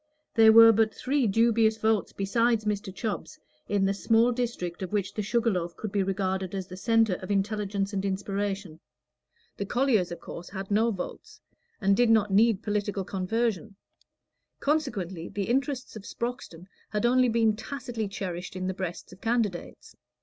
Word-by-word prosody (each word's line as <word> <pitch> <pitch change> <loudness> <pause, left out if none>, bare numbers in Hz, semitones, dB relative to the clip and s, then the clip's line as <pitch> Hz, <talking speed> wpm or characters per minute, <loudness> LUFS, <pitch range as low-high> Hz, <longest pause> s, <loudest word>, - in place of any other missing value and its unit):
There 220 -1 +7
were 225 0 +9
but 220 0 +2
three 270 -2 0
dubious 225 +1 +3
votes 220 -2 +1
besides 225 +3 +1
Mr. 205 -2 -2
Chubb's 205 0 -5 0.3
in 200 -1 +2
the 195 - +2
small 225 +4 +3
district 230 -9 -3
of 185 - -4
which 200 -2 -1
the 215 - -2
Sugar 230 +3 +1
Loaf 175 -3 -3
could 215 - -5
be 200 - +1
regarded 190 -1 -2
as 190 -1 -3
the 180 - -10
centre 225 -1 +2
of 185 - -8
intelligence 200 0 -1
and 195 -1 -1
inspiration: 195 -3 -3 0.8
the 200 - -3
colliers, 240 -9 +2
of 170 - -6
course, 170 - -9
had 195 +1 -7
no 220 +3 +3
votes, 190 -5 -7 0.4
and 195 0 +3
did 245 +2 +3
not 210 -3 +3
need 220 0 +4
political 205 -2 -1
conversion; 205 +2 -2 0.8
consequently, 200 - -1
the 205 - -3
interests 265 +3 -1
of 215 - -7
Sproxton 235 -8 -5 0.2
had 210 +2 -1
only 250 +1 +4
been 225 -2 +2
tacitly 235 -2 -5
cherished 185 -2 -5
in 185 0 -3
the 190 - -1
breasts 185 -1 -6
of 185 - -16
candidates. 225 -6 -2
205 Hz, 165 wpm, -27 LUFS, 190-230 Hz, 0.8 s, were